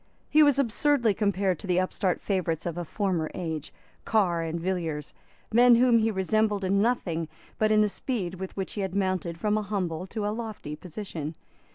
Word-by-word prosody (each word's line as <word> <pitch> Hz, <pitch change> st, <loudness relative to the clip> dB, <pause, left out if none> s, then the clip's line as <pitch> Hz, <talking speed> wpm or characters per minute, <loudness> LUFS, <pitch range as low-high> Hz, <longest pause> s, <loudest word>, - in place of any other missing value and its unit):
He 310 Hz, -, +6 dB
was 290 Hz, -3 st, +5 dB
absurdly 260 Hz, -2 st, +2 dB
compared 195 Hz, -3 st, 0 dB
to -, -, -8 dB
the 180 Hz, 0 st, +2 dB
upstart 185 Hz, 0 st, 0 dB
favourites 175 Hz, -5 st, -1 dB
of 170 Hz, -2 st, -2 dB
a 175 Hz, -, -3 dB
former 175 Hz, -3 st, -1 dB
age, 160 Hz, -4 st, -4 dB, 0.3 s
Carr 185 Hz, -7 st, +2 dB
and 165 Hz, +1 st, -3 dB
Villiers, 165 Hz, -5 st, -3 dB, 0.4 s
men 240 Hz, +1 st, +7 dB
whom 240 Hz, -1 st, +5 dB
he 225 Hz, 0 st, +2 dB
resembled 210 Hz, +1 st, +1 dB
in 195 Hz, +1 st, +2 dB
nothing 180 Hz, -9 st, 0 dB, 0.3 s
but 215 Hz, 0 st, +3 dB
in 215 Hz, 0 st, +5 dB
the 210 Hz, -, +4 dB
speed 200 Hz, -2 st, -3 dB
with 190 Hz, +1 st, -6 dB
which 190 Hz, -2 st, -3 dB
he 205 Hz, -, -3 dB
had 190 Hz, -1 st, -3 dB
mounted 185 Hz, -4 st, -1 dB
from 210 Hz, +3 st, +1 dB
a -, -, -2 dB
humble 185 Hz, -4 st, -3 dB
to 210 Hz, +1 st, -3 dB
a 210 Hz, -, 0 dB
lofty 220 Hz, -9 st, -5 dB
position. 160 Hz, -2 st, -6 dB
195 Hz, 190 wpm, -27 LUFS, 175-215 Hz, 0.4 s, men